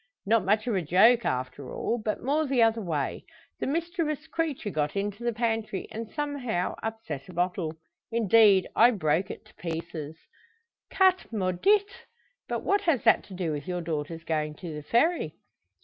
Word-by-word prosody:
"Not 225 +2 +3
much 210 +3 +2
of 240 - 0
a 190 - +1
joke, 215 +9 +5
after 130 +1 -3
all; 240 - -2
but 215 0 -2
more 295 +4 +1
the 260 -3 +3
other 225 0 +2
way. 155 -7 -2 0.4
The - - -2
mischievous 320 0 -2
creature 310 -10 -2
got 150 0 -1
into 205 +3 -3
the 240 - +1
pantry, 225 -3 -2
and 225 0 -6
somehow 280 - -2
upset 220 -10 -5
a - - -9
bottle 175 -2 -1 0.4
indeed, 220 -3 +5 0.3
broke 160 +2 +1
it - - -8
to - - -20
pieces." 160 -2 -5 0.8
"Chat 375 -5 +3
maudit! 225 - +1 0.4
But - - -3
what 405 0 +2
has 330 - +1
that 225 - +5
to 190 - -10
do 175 -3 -2
with 150 +3 -5
your 180 -1 -2
daughter's 165 0 -4
going 155 -2 -2
to 170 0 -7
the 150 - -6
Ferry?" 240 - +1
210 Hz, 165 wpm, -27 LUFS, 165-245 Hz, 0.8 s, joke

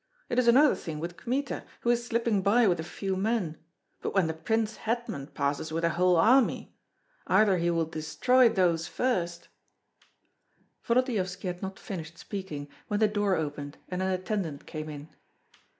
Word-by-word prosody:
It 240 - +1
is 250 - +2
another 270 +5 +6
thing 155 -2 -6
with 170 +2 -5
Kmita, 265 +8 -2 0.2
who 240 - +2
is 240 0 +1
slipping 230 -3 +1
by 215 +4 +4
with 175 -3 +2
a - - -2
few 190 +3 -3
men; 195 -5 -1 0.4
but - - -4
when 190 -3 +4
the 160 - -1
prince 220 +7 -1
hetman 225 - -3
passes 145 +1 -2
with 165 +1 -2
a 170 - +3
whole 180 +2 +3
army? 240 +10 +3 0.5
Either 200 -4 +4
he 170 +1 +1
will 165 -1 +1
destroy 160 - +3
those 175 -5 +1
first 175 -8 -1 0.7
" - - -43
Volodyovski 230 -7 0
had 180 -1 -3
not 190 0 -5
finished 170 -3 -7
speaking 180 -9 -6 0.2
when 205 - -1
the 215 - +5
door 205 -2 +1
opened 145 -2 -4
and 180 0 -2
an 190 - 0
attendant 185 -5 -2
came 155 0 -6
in. 145 0 -8
185 Hz, 170 wpm, -28 LUFS, 165-225 Hz, 0.7 s, another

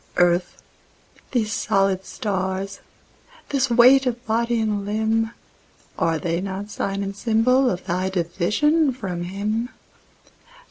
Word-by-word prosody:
Earth, 175 0 +2 0.7
these 220 -4 0
solid 195 -2 +1
stars, 190 -1 -3 0.7
this 270 -2 +1
weight 255 +3 +6
of 240 0 -3
body 235 +1 +1
and 210 -2 -1
limb, 220 +2 0 0.7
Are 165 -1 +1
they 170 +2 -2
not 195 +2 -5
sign 195 0 -2
and 195 0 -5
symbol 245 +5 +3
of 180 -1 -4
thy 185 +1 -1
division 210 - +1
from 180 -8 -4
Him? 210 +6 -2
205 Hz, 120 wpm, -23 LUFS, 190-235 Hz, 0.7 s, weight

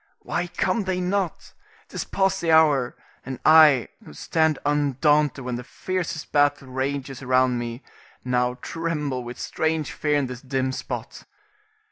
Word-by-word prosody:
Why 175 - -2
come 185 +4 -1
they 185 -1 -1
not? 185 -1 -2 0.4
'Tis - - -4
past 195 -1 0
the 165 - +1
hour, 150 -6 +4 0.3
and 130 -1 -6
I 155 -5 +7
who - - -13
stand 160 - +1
undaunted 145 -1 +2
when 125 -1 -2
the 125 - -7
fiercest 175 +2 -4
battle 145 -2 +2
rages 135 0 -3
round 130 -1 +2
me, 120 +2 -5 0.4
now 125 0 +1
tremble 150 -6 -3
with 120 0 -8
strange 160 -2 -1
fear 150 -1 0
in 140 - +1
this 125 -1 -7
dim 130 0 -1
spot. - - -6
145 Hz, 145 wpm, -24 LUFS, 130-160 Hz, 0.4 s, I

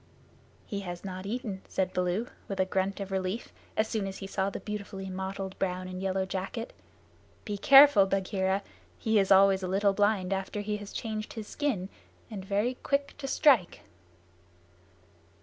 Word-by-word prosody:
"He 200 - -4
has 175 -1 -6
not 185 0 -5
eaten," 215 -4 -4
said 190 -1 -1
Baloo, 180 +5 0 0.2
with 195 - -5
a 190 - +4
grunt 190 +1 -1
of 195 -1 -5
relief, 190 +4 -3 0.2
as 215 - +2
soon 215 -3 -2
as 195 - -6
he 195 - -7
saw 195 0 -1
the - - -6
beautifully 200 -2 -6
mottled 190 0 -4
brown 185 -1 -1
and 185 0 -6
yellow 190 0 0
jacket. 195 +5 -4 0.7
"Be 210 - -3
careful, 270 -3 +8
Bagheera! 190 0 0 0.3
He 220 -1 +2
is 195 -1 +1
always 195 0 +6
a 185 - -2
little 195 +2 +2
blind 205 -2 +2
after 195 +2 -3
he 210 0 -2
has 205 -1 -9
changed 215 -2 -4
his 220 -2 -6
skin, 260 -11 -1 0.4
and 200 -3 -5
very 205 +6 0
quick 280 0 0
to 275 - -4
strike." 265 - +3
195 Hz, 165 wpm, -29 LUFS, 190-215 Hz, 0.7 s, careful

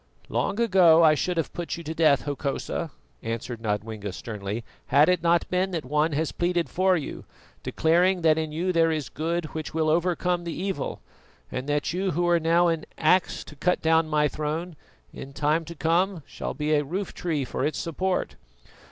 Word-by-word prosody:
"Long 205 - -1
ago 180 -7 +6
I 155 -1 +7
should 175 +3 -1
have 165 - -1
put 170 -1 -4
you 170 - -8
to 160 +1 -4
death, 155 -4 +3
Hokosa," 145 +3 -3 0.3
answered 115 +1 -5
Nodwengo 105 -1 -3
sternly, 105 +2 -5 0.2
"had 145 +4 +5
it 180 -2 +2
not 170 0 +2
been 185 +1 +1
that 165 -6 -4
one 150 +4 +1
has 155 +2 0
pleaded 175 -1 0
for 185 0 +2
you, 150 - -6 0.4
declaring 175 +2 +2
that 160 -1 +5
in 155 -1 -2
you 175 +4 -1
there 165 -1 +4
is 155 -3 -2
good 165 +2 -2
which 155 0 -5
will 160 -1 +1
overcome 175 +1 +1
the 170 -1 -5
evil, 190 -6 -3 0.5
and 130 +3 -4
that 145 +2 0
you 190 +2 0
who 175 +1 +2
now 170 +2 +3
are - - +3
an 160 -1 -6
axe 175 +3 +2
to 150 - -13
cut 180 +5 +1
down 160 0 +3
my 150 -1 +3
throne, 155 +4 -4 0.4
in 140 - -9
time 150 +3 +1
to 170 +2 -9
come 170 +2 +1
shall - - -6
be 150 +2 0
a 150 -1 +3
roof 185 +7 -4
tree 155 -6 -2
for - - -3
its 155 - -1
support. 185 +3 -2
160 Hz, 190 wpm, -26 LUFS, 150-175 Hz, 0.5 s, I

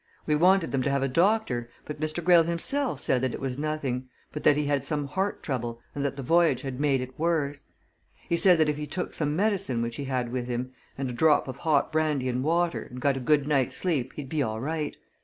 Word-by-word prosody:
We 155 - +1
wanted 180 +3 +4
them 135 - 0
to 140 - 0
have 140 -1 +1
a - - +2
doctor 165 - +1 0.2
but 150 - -7
Mr. 155 +2 -2
Greyle 175 0 +7
himself 170 - -1
said 125 - +1
that 130 -2 -1
it - - -7
was 135 0 -3
nothing, 140 -4 -2 0.2
but 150 - -6
that 145 - +5
he 150 - 0
had 145 -2 0
some 145 0 -1
heart 190 +8 -2
trouble 120 -4 -3
and 140 - -3
that 140 -1 -1
the 135 - -6
voyage 170 +5 +3
had 135 -2 -5
made 140 -3 +2
it 130 +2 -8
worse. 150 -4 0 0.6
He 170 - +1
said 180 +1 +5
that 155 -1 +3
if 150 -1 0
he 150 0 -4
took 180 +5 -4
some 150 -1 -1
medicine 195 - 0
which 115 0 -4
he 140 - -4
had 125 -3 -2
with 125 -1 -3
him, 125 +1 -3 0.3
and 135 0 -2
a 125 - -4
drop 150 +4 +3
of 130 - -6
hot 155 -4 +1
brandy 155 -4 +1
and 125 +1 -1
water, 170 +2 +1
and 125 - -8
got 140 +1 +2
a - - -3
good 145 +2 +2
night's 135 -4 +1
sleep 145 -9 -1
he'd 145 -3 -6
be 155 +2 -1
all 110 -4 -2
right. 150 +3 -3
145 Hz, 245 wpm, -27 LUFS, 130-160 Hz, 0.6 s, Greyle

